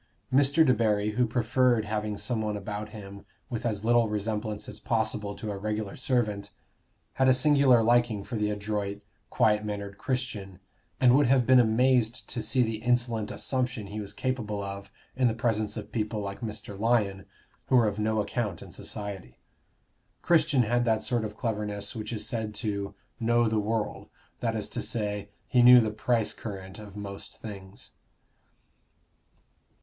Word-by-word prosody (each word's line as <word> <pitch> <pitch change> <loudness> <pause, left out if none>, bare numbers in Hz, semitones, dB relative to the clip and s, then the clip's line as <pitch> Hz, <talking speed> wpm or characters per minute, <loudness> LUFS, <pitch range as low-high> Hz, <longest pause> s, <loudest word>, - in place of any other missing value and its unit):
Mr. 145 +4 +5
Debarry, 105 -5 +2
who 125 +3 +1
preferred 120 0 +2
having 105 0 -2
some 120 -1 -1
one 105 -1 -2
about 105 +1 -5
him 100 -2 -10 0.3
with 120 0 -2
as 105 -1 -2
little 120 -1 +4
resemblance 105 0 -3
as - - -6
possible 100 -1 -1
to 110 - -5
a 100 - -4
regular 105 -1 -3
servant, 110 -6 -1 0.6
had 130 - +2
a 130 - +7
singular 135 -3 +5
liking 120 -3 +2
for 120 - -6
the 105 -1 0
adroit, 105 -1 -3 0.3
quiet 105 -1 +2
mannered 100 -1 -5
Christian, 115 -8 -3 0.4
and 125 -1 +6
would 145 -2 +4
have 130 -1 +4
been 130 +1 +6
amazed 120 0 +2
to 120 - -2
see 120 +4 +2
the 110 -1 -1
insolent 120 -3 +1
assumption 125 -4 -2
he 105 +2 -6
was 100 -1 -6
capable 105 -4 -2
of 100 0 -6 0.3
in 130 -1 +3
the 110 - 0
presence 110 -3 0
of - - -7
people 110 -1 -2
like 100 +1 -5
Mr. 105 -3 -6
Lyon, 105 -4 +1 0.4
who - - +3
were 120 -3 +5
of 105 0 -2
no 110 0 +1
account 105 -3 -2
in - - -12
society. 100 -11 -6 0.9
Christian 155 -6 +4
had 120 +2 +1
that 110 -2 +1
sort 120 -3 0
of 105 0 -6
cleverness 105 -2 -3
which 110 0 -5
is 110 -3 -2
said 110 -4 -3
to 100 -1 -3 0.2
"know 120 0 +3
the 110 0 +1
world" 110 +1 -2 0.3
that 115 -2 -1
is 105 -2 -2
to - - -4
say, 105 -2 -2 0.2
he 125 - +4
knew 125 +1 +10
the 110 -2 +1
price 110 +1 0
current 95 -2 -8
of 105 -2 -11
most 100 -1 -8
things. 100 -3 -10
110 Hz, 165 wpm, -28 LUFS, 105-120 Hz, 0.9 s, knew